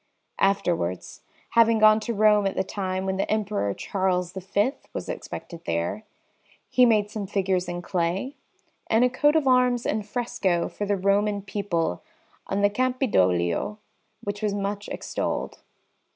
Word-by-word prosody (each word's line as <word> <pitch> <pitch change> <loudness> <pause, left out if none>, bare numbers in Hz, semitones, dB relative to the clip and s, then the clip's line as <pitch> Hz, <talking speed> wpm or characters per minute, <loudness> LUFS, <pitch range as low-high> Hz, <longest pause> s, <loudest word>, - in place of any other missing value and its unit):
Afterwards, 175 - 0 0.3
having 230 -1 +5
gone 215 0 +6
to 235 +2 -3
Rome 210 -1 +4
at 195 - -3
the - - +1
time 190 -1 -3
when 190 0 -1
the 195 - -1
Emperor 210 - 0
Charles 180 -2 -1
V 200 +5 0 0.2
was - - -5
expected 170 -2 -7
there, 85 - -2 0.7
he 250 -1 +6
made 210 -2 +2
some 210 -2 -4
figures 190 -2 0
in 175 0 -4
clay, 180 +10 -1 0.5
and 225 +2 +3
a 250 - +1
coat 295 +4 +3
of 315 -3 +3
arms 250 -1 +3
in 215 - 0
fresco 205 -5 -1
for 205 - -5
the 205 0 +1
Roman 200 +1 +1
people 190 - -2 0.5
on 200 +1 -1
the 205 - +5
Campidoglio, 210 - +1 0.5
which 205 +1 -4
was 210 -2 0
much 200 +1 -3
extolled. - - -3
200 Hz, 150 wpm, -25 LUFS, 185-215 Hz, 0.7 s, gone